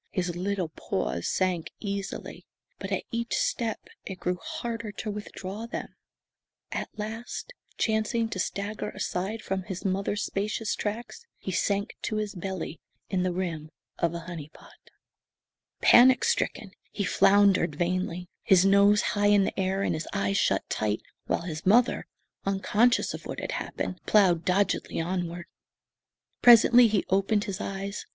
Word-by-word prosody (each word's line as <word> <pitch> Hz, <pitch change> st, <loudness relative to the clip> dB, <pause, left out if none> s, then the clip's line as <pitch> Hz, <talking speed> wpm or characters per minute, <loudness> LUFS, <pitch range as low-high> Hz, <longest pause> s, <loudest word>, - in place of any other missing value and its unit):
His 180 Hz, -3 st, -2 dB
little 185 Hz, -1 st, -2 dB
paws 65 Hz, -, -3 dB
sank 185 Hz, -3 st, 0 dB
easily, 200 Hz, -1 st, -5 dB, 0.3 s
but -, -, -6 dB
at -, -, 0 dB
each 235 Hz, 0 st, -1 dB
step 225 Hz, -3 st, -1 dB, 0.2 s
it 190 Hz, -2 st, -7 dB
grew 180 Hz, 0 st, -1 dB
harder 235 Hz, -9 st, -4 dB
to 210 Hz, +1 st, -4 dB
withdraw 205 Hz, +1 st, -6 dB
them. 235 Hz, -, -6 dB, 0.8 s
At -, -, -3 dB
last, 225 Hz, -, -5 dB, 0.2 s
chancing 220 Hz, +1 st, +1 dB
to 200 Hz, -, -4 dB
stagger 200 Hz, +3 st, -3 dB
aside 200 Hz, +5 st, -3 dB
from 190 Hz, 0 st, -2 dB
his 185 Hz, 0 st, -7 dB
mother's 195 Hz, +2 st, 0 dB
spacious 215 Hz, +2 st, -2 dB
tracks, 235 Hz, -, -5 dB
he 190 Hz, -, -5 dB
sank 200 Hz, +3 st, 0 dB
to 215 Hz, -, -2 dB
his 215 Hz, -1 st, -2 dB
belly 185 Hz, -3 st, -5 dB, 0.3 s
in 185 Hz, -2 st, +1 dB
the 180 Hz, 0 st, +1 dB
rim 170 Hz, -4 st, -3 dB, 0.3 s
of 170 Hz, 0 st, +1 dB
a 170 Hz, -, -4 dB
"honey 165 Hz, -3 st, -7 dB
pot." -, -, -17 dB, 1.1 s
Panic 255 Hz, +1 st, +7 dB
stricken, 195 Hz, -, 0 dB, 0.2 s
he 205 Hz, -, -2 dB
floundered 195 Hz, -4 st, +4 dB
vainly, 180 Hz, +1 st, -1 dB
his 190 Hz, -1 st, +5 dB
nose 200 Hz, +1 st, +5 dB
high 205 Hz, 0 st, +2 dB
in 205 Hz, -1 st, +5 dB
the 195 Hz, -, -2 dB
air 190 Hz, +1 st, 0 dB
and -, -, +1 dB
his 155 Hz, 0 st, -4 dB
eyes 100 Hz, 0 st, 0 dB
shut -, -, +1 dB
tight, 105 Hz, 0 st, -1 dB, 0.2 s
while -, -, 0 dB
his 160 Hz, -2 st, -5 dB
mother, 235 Hz, +6 st, +3 dB, 0.4 s
unconscious 205 Hz, +5 st, +2 dB
of -, -, -8 dB
what -, -, -5 dB
had -, -, -4 dB
happened, 180 Hz, -, -4 dB
ploughed 185 Hz, -6 st, +4 dB
doggedly 190 Hz, 0 st, +1 dB
onward. 175 Hz, 0 st, -3 dB, 1.0 s
Presently 240 Hz, 0 st, +8 dB
he 210 Hz, -3 st, +1 dB
opened 195 Hz, +2 st, +2 dB
his 200 Hz, -1 st, -4 dB
eyes. 195 Hz, +1 st, -5 dB
195 Hz, 150 wpm, -27 LUFS, 180-215 Hz, 1.1 s, Presently